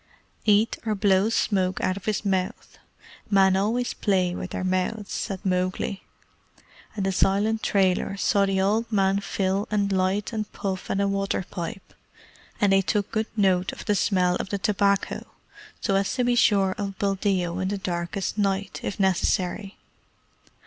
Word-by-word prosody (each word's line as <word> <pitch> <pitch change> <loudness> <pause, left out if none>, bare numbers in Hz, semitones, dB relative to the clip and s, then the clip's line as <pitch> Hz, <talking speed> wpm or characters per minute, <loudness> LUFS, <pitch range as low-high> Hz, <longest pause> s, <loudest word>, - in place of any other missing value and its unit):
"Eat 215 +1 +3
or 220 -2 -1
blow 195 0 +3
smoke 190 -5 +1
out 185 - +1
of 195 - -9
his 215 -1 -1
mouth. 190 -2 -2 0.5
Men 195 -2 +4
always 225 +6 0
play 185 -4 +1
with 180 - -5
their - - -4
mouths," 185 +3 -1
said 195 -1 -4
Mowgli; 185 +1 -1 0.9
and 200 -3 -2
the 195 - +1
silent 205 +4 +2
trailers 195 0 +1
saw 200 -1 +3
the 195 0 0
old 215 +4 +1
man 195 -1 +2
fill 195 0 -1
and 205 -1 0
light 190 +3 0
and 215 -1 -3
puff 190 -1 -4
at 195 - 0
a 200 - +2
water 195 -1 -1
pipe, 175 +1 -6 0.7
and 200 -2 +3
they 195 - +5
took 205 +1 -1
good 220 0 -1
note 190 -3 +2
of - - -9
the 210 - +2
smell 185 -3 +2
of - - -5
the 200 - -1
tobacco, 200 0 +1 0.6
so 195 - 0
as 195 0 +1
to 250 - +1
be 245 0 +2
sure 200 -5 +3
of 195 -1 -4
Buldeo 190 -3 0
in 185 - -1
the 200 +1 -1
darkest 180 +2 -3
night, 195 -1 -1
if 200 - -4
necessary. 190 +1 0
195 Hz, 165 wpm, -25 LUFS, 190-205 Hz, 0.9 s, they